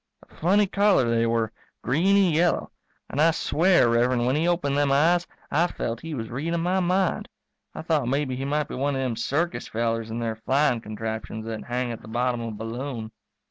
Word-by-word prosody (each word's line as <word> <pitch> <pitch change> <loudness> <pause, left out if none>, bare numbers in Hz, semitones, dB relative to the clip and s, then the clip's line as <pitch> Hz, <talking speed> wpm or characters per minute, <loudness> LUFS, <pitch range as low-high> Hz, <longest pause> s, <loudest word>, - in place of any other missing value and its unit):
A - - -24
funny 200 +5 +3
color 200 - +3
they 115 0 +2
were, 115 -1 0 0.3
greeny 185 - +3
yellow. 170 +2 +1 0.4
And 145 - -1
I 165 - +6
swear, 165 -1 +3
Rev'rend, 120 +1 +2
when 130 +2 +2
he 160 +3 +1
opened 170 -5 +1
them 145 -1 +2
eyes 170 +5 +3 0.2
I 170 +4 +3
felt 115 -8 -4
he 165 -2 -5
was 115 -3 -5
readin' 165 +7 -2
my 180 +2 +1
mind. 185 0 0 0.5
I - - -6
thought 155 -6 +1
maybe 135 0 0
he 130 - -4
might 150 +1 -1
be - - -8
one 140 +2 -1
of 135 - -1
them 125 -3 -1
circus 155 +9 -1
fellers 115 0 -2
in 115 - -4
their 115 -2 -3
flying 130 +1 +1
contraptions 110 0 -5
that 110 -1 -5
hang 125 0 -2
at 115 - -7
the - - -13
bottom 120 +1 -1
of 115 - -4
a 110 - -6
balloon. 115 0 -5
135 Hz, 205 wpm, -25 LUFS, 115-165 Hz, 0.5 s, I